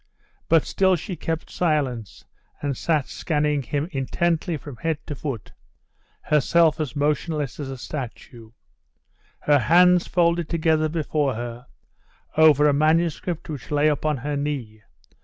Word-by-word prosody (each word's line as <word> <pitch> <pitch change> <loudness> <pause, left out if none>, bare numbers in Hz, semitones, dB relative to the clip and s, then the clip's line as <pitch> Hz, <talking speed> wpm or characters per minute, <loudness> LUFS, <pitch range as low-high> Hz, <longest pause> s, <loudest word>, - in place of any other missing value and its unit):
But 165 -2 +4
still 190 -1 +2
she 175 +3 -5
kept 165 -1 -4
silence, 140 - -1 0.3
and 145 -2 -2
sat 155 0 0
scanning 150 -2 -1
him 145 +4 -2
intently 165 +4 -1
from 145 -3 -10
head 160 +6 -1
to - - -5
foot, 135 -6 -6 0.7
herself 155 +1 +3
as 155 -2 -3
motionless 150 0 -1
as 140 -2 -4
a 135 - -6
statue; 120 -4 -8 0.9
her 145 -1 +4
hands 180 +4 +5
folded 170 -2 +1
together 155 -2 +1
before 150 -4 -1
her, 120 +2 -6 0.7
over 155 -2 +6
the 150 -1 +5
manuscript 160 +3 +1
which 145 -7 -7
lay 150 +1 +3
upon 150 0 0
her 145 +3 -3
knee. 135 -7 -4
150 Hz, 135 wpm, -23 LUFS, 140-165 Hz, 0.9 s, over